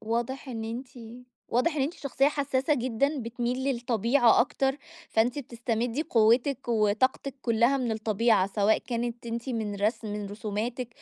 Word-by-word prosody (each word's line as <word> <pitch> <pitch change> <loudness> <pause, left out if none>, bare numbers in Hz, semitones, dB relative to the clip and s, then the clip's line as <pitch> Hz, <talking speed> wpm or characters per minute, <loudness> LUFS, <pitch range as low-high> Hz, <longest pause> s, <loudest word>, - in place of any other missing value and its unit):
واضح 235 +5 -3
إن 225 -3 -4
أنتِ 235 +4 -5 0.6
واضح 295 +7 +1
إن 280 - +1
أنتِ 295 +6 -2
شخصية 275 -1 0
حسّاسة 285 0 0
جدًا 260 +3 0
بتميل 240 +1 -2
للطبيعة 240 -1 +3
أكتر، 270 +2 +1 0.3
فأنتِ 235 +5 +2
بتستمدي 240 0 -2
قوتِك 240 -1 +2
وطاقتِك 230 +5 +1
كلها 235 +3 +3
من 250 -4 -1
الطبيعة، 220 -2 +2
سواء 205 +2 +2
كانت 240 0 -4
أنتِ 235 +2 -4
من 220 -4 -2
رسم 215 +2 -1
من 210 -1 -4
رسوماتِك 220 +4 -4
235 Hz, 140 wpm, -28 LUFS, 225-265 Hz, 0.6 s, للطبيعة